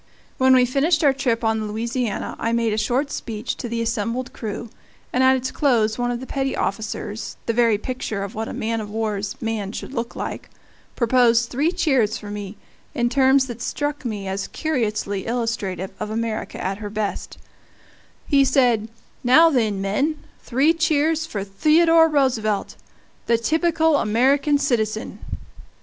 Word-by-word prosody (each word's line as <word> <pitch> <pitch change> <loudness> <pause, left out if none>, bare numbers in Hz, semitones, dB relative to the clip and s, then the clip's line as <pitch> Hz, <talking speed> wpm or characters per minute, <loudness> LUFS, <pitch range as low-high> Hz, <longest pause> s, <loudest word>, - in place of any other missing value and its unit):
When 260 0 +6
we 250 -1 +5
finished 285 +7 +1
our 280 -2 +5
trip 240 -3 -1
on 220 0 +1
the 215 - -3
Louisiana 230 +1 -3
I 230 - -1
made 230 -2 +1
a - - -1
short 270 +6 0
speech 225 0 -4
to 240 - -5
the 230 0 -1
assembled 230 +2 -2
crew, 220 0 -6 0.4
and 255 - +3
at 260 0 +6
its 260 0 -3
close 230 -6 +1
one 245 0 0
of 240 -1 -2
the 260 - -7
petty 270 0 -2
officers, 215 +1 -4
the 230 - 0
very 230 -2 +3
picture 220 -3 -4
of 200 - -6
what 220 +1 -4
a - - -5
man 225 0 -2
of 210 - -7
war's 210 -2 -3
man 220 -3 -3
should 240 - -7
look 235 -1 -4
like, - - -5 0.5
proposed 235 -1 +3
three 295 +7 +1
cheers 270 - +1
for 205 -1 -9
me 205 0 -6 0.4
in 240 0 +1
terms 265 0 +4
that 240 -2 -8
struck 290 +3 -3
me 210 -5 -4
as 195 +1 -3
curiously 215 - -2
illustrative 225 -5 -2
of 215 - -4
America 225 0 -3
at 195 +2 -3
her 210 -2 -5
best; 210 -1 -4 0.9
he 280 -2 +4
said, 245 -5 +2 0.3
"Now 315 +7 +6
then, 215 -7 +1
men, 270 +11 0 0.2
three 275 +6 +2
cheers 320 -1 +1
for 205 -10 -4
Theodore 325 +11 +4
Roosevelt, 240 -8 0 0.5
the 230 - +4
typical 320 +4 +2
American 275 +7 +2
citizen!" 220 -5 -1
235 Hz, 165 wpm, -22 LUFS, 215-270 Hz, 0.9 s, When